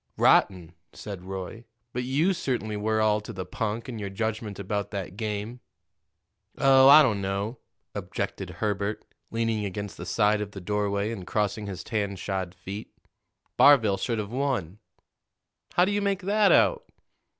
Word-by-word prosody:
"Rotten," 90 -4 +3 0.2
said 100 -3 -8
Roy. 95 +4 -6 0.3
"But 125 - -2
you 150 +9 +2
certainly 120 -10 -2
were 110 +1 0
all 105 0 +2
to 105 - -8
the 95 -4 -5
punk 115 +3 -3
in 120 -4 -6
your 100 -1 -4
judgment 110 0 -3
about 100 +1 -3
that 95 -3 -5
game." 110 +2 -4 1.0
"Oh, 135 0 +6
I 150 +2 +10
don't 110 -7 +1
know," 100 +5 -3 0.3
objected - - -4
Herbert, 105 0 -2 0.2
leaning 115 -2 -1
against 100 -2 -5
the 85 - -7
side 105 0 +2
of 100 -1 -5
the 95 - -7
doorway 100 +2 -1
and 95 -6 -7
crossing 105 0 -1
his 95 -3 -6
tan 100 -3 -2
shod 95 -1 -4
feet. 95 +3 -7 0.7
"Barville 115 -9 +6
should 115 +4 -2
have 105 -1 -4
won." 120 - -2 1.0
"How 180 - +5
do 195 - -1
you 205 0 0
make 200 -1 -1
that 205 +2 +3
out?" - - +4
105 Hz, 160 wpm, -27 LUFS, 100-120 Hz, 1.0 s, I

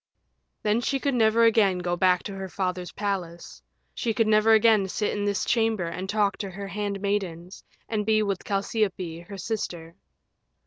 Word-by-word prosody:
Then 215 +3 +2
she 275 +2 0
could 280 +1 0
never 230 -1 +4
again 215 -5 +4
go 175 -1 -1
back 180 0 +3
to 200 - -6
her 195 -1 -6
father's 180 -2 -3
palace, 185 -5 -4 0.3
she 225 -2 -2
could 225 - +3
never 215 +1 +4
again 220 -2 +5
sit 210 +3 -2
in 205 0 -2
this 200 -2 0
chamber 225 -5 +1
and 185 +3 -5
talk 205 -1 +1
to 200 - -5
her 195 +2 -7
handmaidens, 200 -3 -3 0.2
and 215 -2 -1
be 215 0 +2
with 200 -3 -2
Chalciope, 190 -5 -2
her 200 -1 -8
sister. 175 -5 -4
200 Hz, 170 wpm, -26 LUFS, 185-215 Hz, 0.3 s, again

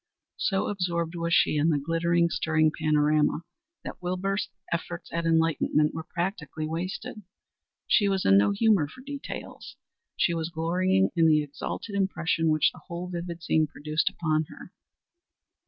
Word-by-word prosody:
So 195 -1 +1
absorbed 170 -4 -1
was 170 -1 -2
she 155 - +4
in 150 +3 +3
the 155 - +2
glittering, 170 +3 +1
stirring 155 -1 +2
panorama 155 0 +2 0.4
that - - -8
Wilbur's 190 +3 -1 0.2
efforts 170 +1 -5
at 170 0 -1
enlightenment 160 -2 +2
were 160 +1 -6
practically 170 -4 -3
wasted. 185 +8 -4 0.6
She 205 -3 +3
was 195 -1 0
in 95 - +6
no 100 +1 +5
humor 200 -6 +3
for 255 - -13
details; 280 +1 -8 0.4
she 175 - +2
was 165 -1 -2
glorying 185 +4 +1
in 165 -1 +4
the 155 -1 +4
exalted 150 +8 -6
impression 170 -4 0
which 155 -1 +3
the - - -15
whole 175 +1 -5
vivid 170 -1 -5
scene 155 -1 +2
produced 155 +2 -1
upon 155 -2 0
her. - - -12
170 Hz, 150 wpm, -27 LUFS, 155-185 Hz, 0.6 s, in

